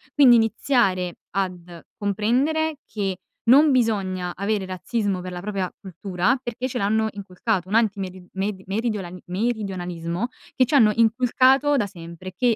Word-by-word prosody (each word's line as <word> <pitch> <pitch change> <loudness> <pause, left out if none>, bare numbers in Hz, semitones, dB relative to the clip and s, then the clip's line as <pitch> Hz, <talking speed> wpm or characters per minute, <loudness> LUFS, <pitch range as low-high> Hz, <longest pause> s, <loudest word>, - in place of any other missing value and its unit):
Quindi 260 -5 +7
iniziare 220 -6 +1 0.2
ad 180 -3 -4
comprendere 255 +10 0
che 195 -3 -3 0.3
non 290 +5 +7
bisogna 195 -8 0
avere 200 0 -1
razzismo 190 +1 -2
per 180 0 -6
la 175 0 -6
propria 195 -2 -3
cultura 190 +4 -1
perché 245 0 -4
ce 250 -1 -4
l'hanno 220 +2 +1
inculcato, 195 -1 -3
un 210 - -1
antimeri 195 -5 0
med 190 0 -3
meridionali 195 -4 -3
meridionalismo 185 -2 -2 0.3
che 255 - +4
ci 250 - -5
hanno 225 -7 +6
inculcato 255 +5 +4
da 225 - +1
sempre, 175 -1 -9
che, 240 +2 +2
205 Hz, 140 wpm, -23 LUFS, 185-235 Hz, 0.3 s, Quindi